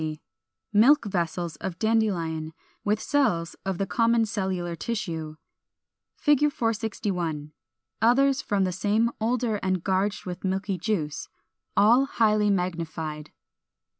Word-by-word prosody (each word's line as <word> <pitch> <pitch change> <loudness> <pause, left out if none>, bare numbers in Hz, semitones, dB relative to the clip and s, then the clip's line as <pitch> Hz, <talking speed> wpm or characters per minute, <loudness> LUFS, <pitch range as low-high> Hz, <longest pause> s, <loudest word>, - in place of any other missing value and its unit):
460. 155 -1 -4 0.5
Milk 240 +6 +6
Vessels 170 -4 -2
of 185 -2 -5
Dandelion, 175 -8 0 0.3
with 210 +1 +1
cells 180 - +1
of 195 -2 -2
the 195 - 0
common 230 +3 +2
cellular 190 -5 -2
tissue. 165 -5 -4 0.8
461. 220 - 0 0.5
Others 265 +4 +4
from 200 -2 0
the 185 - 0
same 210 +5 +1
older 230 -1 0
and 185 -3 -1
gorged 195 +2 0
with 180 0 -6
milky 190 0 -1
juice. 170 -7 -2 0.5
All 235 +7 +6
highly 215 -5 +2
magnified. 165 -5 -3
195 Hz, 110 wpm, -26 LUFS, 170-225 Hz, 0.8 s, Milk